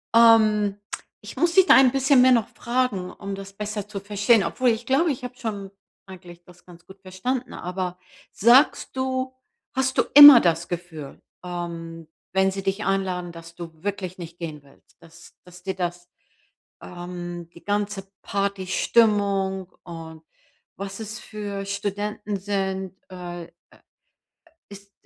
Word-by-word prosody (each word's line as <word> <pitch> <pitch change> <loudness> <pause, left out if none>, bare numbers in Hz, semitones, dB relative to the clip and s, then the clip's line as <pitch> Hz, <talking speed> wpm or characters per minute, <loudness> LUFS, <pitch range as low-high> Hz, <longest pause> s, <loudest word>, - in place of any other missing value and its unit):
Ähm, 215 -3 +5 0.4
ich 210 - -10
muss 340 +3 +2
dich 380 -1 +7
da - - +8
ein 265 -2 +6
bisschen 270 0 +4
mehr 255 0 +6
noch 230 -4 +3
fragen, 235 -7 -2
um 200 +1 -7
das 195 0 -10
besser 210 0 -5
zu 210 -2 -6
verstehen, 205 +2 +2
obwohl 255 -1 +1
ich 230 +1 -1
glaube, 285 +7 +2
ich 255 -1 -6
habe 250 0 -7
schon 205 -5 -5 0.4
eigentlich 175 -2 -13
das 180 0 -19
ganz 175 -1 -16
gut 190 0 -15
verstanden, 245 +7 -4
aber 180 0 -5 0.3
sagst 250 +5 +4
du 260 0 -2 0.4
hast 265 0 0
du - - +5
immer 290 -3 +12
das 170 0 0
Gefühl, 165 -5 -7 0.2
ähm, 170 -2 -6 0.3
wenn 190 0 +3
sie 195 0 -5
dich 195 +2 -2
einladen, 185 -3 -1
dass 165 0 -12
du 165 -2 -10
wirklich 190 -2 -4
nicht 170 -1 -10
gehen 155 -4 -7
willst, 140 -1 -24
dass 165 0 -17
dass 180 0 -15
dir 190 0 -3
das, 175 -1 -4 0.7
ähm, 175 -1 -7
die 170 - -16
ganze 205 -1 -2
Partystimmung 200 -1 0
und 165 -2 -10 0.5
was 195 +1 -6
es 220 +1 -6
für 205 -2 -6
Studenten 205 +1 -3
sind, 190 -1 -3
äh, 175 -2 -7
äh, - - -24 1.2
ist 200 0 -14
195 Hz, 150 wpm, -24 LUFS, 175-215 Hz, 1.2 s, immer